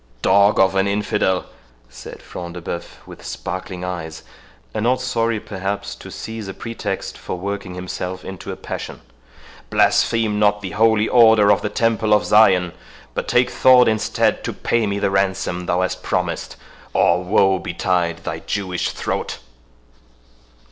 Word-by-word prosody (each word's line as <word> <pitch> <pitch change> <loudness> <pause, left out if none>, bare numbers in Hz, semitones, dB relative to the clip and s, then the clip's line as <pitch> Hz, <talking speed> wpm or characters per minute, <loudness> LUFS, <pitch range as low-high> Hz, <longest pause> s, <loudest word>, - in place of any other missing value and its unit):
"Dog 100 +1 +4
of 95 0 +4
an 95 0 +2
infidel," 100 -2 0 0.4
said - - -11
Front 85 -1 -8
de 90 - -6
Bœuf, 85 - -7
with - - -12
sparkling 90 -1 -5
eyes, 80 -3 -6 0.5
and 110 - -2
not 125 +1 +2
sorry, 115 -3 0
perhaps, 95 - -4
to - - -11
seize 110 -2 -7
a 95 - -7
pretext 115 -1 -5
for - - -5
working 100 0 -5
himself 90 0 -5
into 95 -1 -7
a - - -5
passion, - - -7 0.7
"blaspheme 110 -2 +2
not 105 0 +3
the 95 - -5
Holy 110 +1 +3
Order 110 -4 +6
of 100 - +3
the 105 - -2
Temple 110 -1 +2
of 105 - +1
Zion, 95 -5 +4 0.4
but - - -3
take 125 0 +2
thought 130 -1 +6
instead 110 -1 +1
to - - -3
pay 115 -2 0
me 100 0 -1
the 100 -1 0
ransom 95 -2 -1
thou 90 +1 +1
hast 95 - -2
promised, - - -2 0.4
or 90 +1 +3
woe 95 +1 +3
betide 85 -1 -1
thy - - -4
Jewish 95 -3 -2
throat!" - - -3
100 Hz, 155 wpm, -20 LUFS, 90-110 Hz, 0.7 s, Order